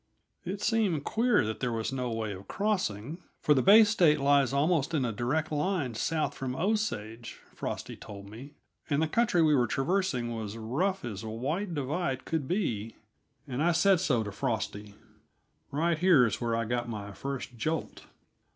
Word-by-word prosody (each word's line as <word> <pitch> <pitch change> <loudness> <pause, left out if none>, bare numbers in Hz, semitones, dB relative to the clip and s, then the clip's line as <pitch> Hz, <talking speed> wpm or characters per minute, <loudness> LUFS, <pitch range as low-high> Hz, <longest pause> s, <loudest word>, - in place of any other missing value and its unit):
It 195 +3 -5
seemed 205 -10 +1
queer 230 - +2
that 110 +1 -4
there 125 -2 -1
was 115 +3 -2
no 125 -2 -2
way 115 -2 -3
of 95 +1 -10
crossing, 170 - -2 0.2
for 150 - +4
the 135 - +3
Bay 210 - +8
State 180 -8 +4
lies 140 -1 +3
almost 155 +2 +1
in 135 -4 +1
a 115 - -1
direct 130 +9 -1
line 150 -4 -1
south 155 +7 -1
from 130 -1 -4
Osage, 145 - -2
Frosty - - -5
told 100 -1 -10
me, 125 +8 -11 0.3
and 145 -1 +2
the 160 - +2
country 200 -2 +2
we 155 -1 +4
were 125 -4 +3
traversing 135 -6 0
was 110 -1 -5
rough 160 - -1
as 105 -3 -5
White 150 - -3
Divide 140 -1 -2
could 160 -5 -2
be, 115 - -2 0.5
and 130 +1 -3
I 175 +2 +3
said 180 +2 +4
so 125 -8 +1
to 105 - -5
Frosty. 105 -3 -3 0.7
Right 160 +3 0
here 170 -8 +6
is 110 0 -2
where 115 -1 0
I 115 0 -1
got 120 +1 -2
my 105 -3 -5
first 135 +2 -5
jolt. 155 +8 -3
140 Hz, 175 wpm, -29 LUFS, 115-170 Hz, 0.7 s, Bay